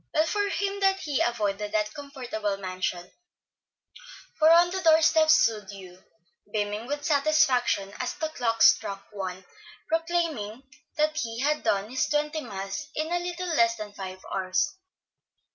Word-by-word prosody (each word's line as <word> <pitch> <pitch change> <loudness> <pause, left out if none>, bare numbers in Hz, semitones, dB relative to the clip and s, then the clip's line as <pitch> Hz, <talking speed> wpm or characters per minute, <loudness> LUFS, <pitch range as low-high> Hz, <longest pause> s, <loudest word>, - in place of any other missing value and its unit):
Well 310 - +4
for 410 +4 0
him 400 0 -2
that 385 -1 +2
he 290 -3 -1
avoided 210 -3 -1
that 215 0 0
comfortable 245 -8 -4
mansion; 185 -2 -4 1.3
for 310 0 +6
on 345 +1 +6
the 380 0 -2
door 320 -2 +6
steps 315 0 +5
stood 215 -8 +1
Hugh, 185 -2 -11 0.5
beaming 210 +2 -2
with 290 +1 -4
satisfaction 280 -9 +2
as 255 - -3
the 315 - -3
clock 230 -6 0
struck 195 0 +3
one, 190 -2 -6 0.4
proclaiming 325 -9 -1 0.3
that 305 0 +1
he 230 -5 -3
had 300 +2 +1
done 200 +2 0
his 260 - 0
twenty 300 +1 0
miles 195 +5 -5
in 310 +2 -2
a 350 - +1
little 355 +1 -4
less 230 -3 +4
than 210 -2 -8
five 190 -1 -8
hours. 185 +8 0
250 Hz, 150 wpm, -27 LUFS, 205-315 Hz, 1.3 s, for